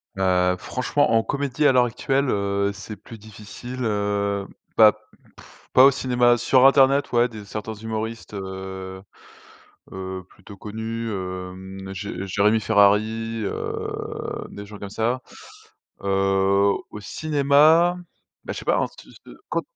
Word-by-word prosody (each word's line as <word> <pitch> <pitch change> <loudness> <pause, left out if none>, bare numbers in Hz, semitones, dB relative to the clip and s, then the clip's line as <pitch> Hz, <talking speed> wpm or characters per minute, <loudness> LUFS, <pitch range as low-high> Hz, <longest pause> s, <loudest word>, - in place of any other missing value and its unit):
Heu, 90 -1 +2
franchement, 125 +7 0
en 115 0 +3
comédie 140 +2 0
à - - +6
l'heure 125 -1 +4
actuelle, 135 +3 0
heu, 100 -1 0
c'est 105 +2 -8
plus 115 - -12
difficile, 110 +4 -9
heu, 100 -2 -1 0.3
bah 110 -2 +7 0.4
pff, - - -18
pas 130 - +8
au 140 - +7
cinéma. 125 -3 +2
Sur 130 +2 +4
internet 135 +1 +5
ouais 120 0 +3
des 110 -4 -10
certains 105 +2 -5
humoristes, 110 +1 -5
heu 95 -1 -7 0.9
heu, 95 0 -6
plutôt 100 - -14
connus, 110 +2 -5
hem, 95 0 -6
Jé 95 -1 -5
Jérémy 105 +3 +2
Ferrari, 110 +3 +2
heu, - - -4 0.6
des 100 - -9
gens 105 0 -11
comme 100 - -7
ça. 120 +4 -1 0.8
Heu, 100 - -3 0.8
au 105 - -8
cinéma, 155 - +3 0.5
bah - - -4
je - - -6
sais - - -11
pas, - - +3
hein, - - +1 0.2
se - - -18
se - - -17 0.3
quand - - 0
110 Hz, 145 wpm, -23 LUFS, 100-125 Hz, 0.9 s, pas